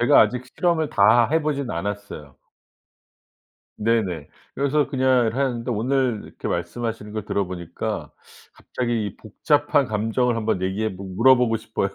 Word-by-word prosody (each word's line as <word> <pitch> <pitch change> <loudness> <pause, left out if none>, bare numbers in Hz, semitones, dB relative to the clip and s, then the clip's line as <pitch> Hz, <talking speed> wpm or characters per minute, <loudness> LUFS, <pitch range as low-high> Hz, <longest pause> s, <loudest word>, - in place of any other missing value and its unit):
제가 120 - +6
아직 125 0 +2
실험을 160 +2 0
다 120 -1 +5
해 160 +1 +3
보진 140 -3 -2
않았어요. 90 -6 -5 1.4
네네. 105 -9 0 0.3
그래서 140 +1 +1
그냥 130 -4 +2
하는데 125 -2 -1
오늘 125 0 0
이렇게 - - -7
말씀하시는 105 +4 -3
걸 110 -2 -4
들어 100 -2 -1
보니까 85 -2 -5 0.4
갑자기 115 -5 -3
복잡한 145 +5 +1
감정을 115 +3 0
한번 110 -4 -1
얘기해 100 +2 -1
보고 95 +1 -8
물어 130 +6 +6
보고 120 -2 +1
싶어요. 110 -3 -2
115 Hz, 320 characters per minute, -23 LUFS, 105-130 Hz, 1.4 s, 제가